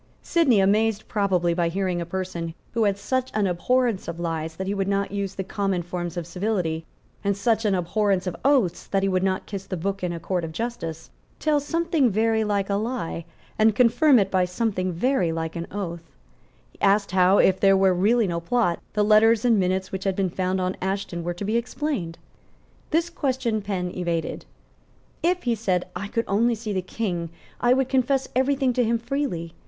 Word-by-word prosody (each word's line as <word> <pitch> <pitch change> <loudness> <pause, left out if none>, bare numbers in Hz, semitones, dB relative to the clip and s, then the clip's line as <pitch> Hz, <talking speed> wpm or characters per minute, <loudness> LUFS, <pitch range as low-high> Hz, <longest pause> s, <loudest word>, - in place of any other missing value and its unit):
Sidney, 280 -11 +3
amazed 210 +2 +2
probably 185 -5 +1
by 170 -1 +1
hearing 180 -1 -1
a 170 - -5
person, 170 -2 -4 0.2
who 230 -2 +2
had 200 -1 +1
such 260 +5 -1
an 210 -1 +2
abhorrence 230 +4 +1
of 170 0 -5
lies 165 -1 -3
that 190 - -4
he 195 - -1
would 195 -1 -1
not 200 0 0
use 200 -1 -3
the 190 - -3
common 195 -2 -1
forms 175 0 -5
of 175 - -3
civility, 175 -3 -2 0.4
and 200 -1 0
such 225 +2 +1
an 200 -2 +3
abhorrence 190 +1 0
of 180 -2 -3
oaths 255 -11 +2
that 195 -1 0
he - - +2
would 185 -1 +1
not 190 0 0
kiss 195 -2 -6
the 185 - -3
book 195 +3 -3
in 180 - 0
a 170 - -4
court 180 +1 -2
of 165 - -4
justice, 165 -6 -5 0.3
tell 305 -1 +2
something 320 -2 +1
very 220 +1 +2
like 200 -2 0
a 200 - -1
lie, 215 -7 -3 0.3
and 215 -1 +4
confirm 250 +4 +5
it 195 -3 +2
by 185 -1 +3
something 185 0 -1
very 185 -1 +1
like 160 0 -3
an 170 0 -4
oath, 170 -4 -6 0.6
asked 200 0 +3
how, 185 +1 +4
if 190 -1 +4
there 195 -1 +5
were 190 -1 +4
really 215 +6 +3
no 170 -3 -1
plot, 175 0 0
the 210 - +2
letters 220 +2 +5
and 230 -4 +4
minutes 185 0 0
which 190 0 -5
had 195 -1 +1
been 190 -2 0
found 185 +1 -1
on 185 0 -1
Ashton 190 -2 -3
were 175 +1 -3
to 200 - -5
be 220 +3 +1
explained. 235 - -3 0.7
This 335 +1 +1
question 255 -8 -1
Penn 190 -3 -3
evaded. 170 -3 -2 0.8
"If," 355 +2 +1
he 240 - +1
said, 190 -5 0
"I 200 - -4
could 230 +3 -1
only 230 +4 +2
see 215 -1 -4
the 190 - 0
King, 180 -4 -3 0.3
I 245 +1 +4
would 265 -1 +1
confess 265 +1 +1
every 265 +2 +3
thing 265 -2 +1
to 245 - +2
him 230 +1 +2
freely. 230 - -3
195 Hz, 200 wpm, -24 LUFS, 180-230 Hz, 0.8 s, confirm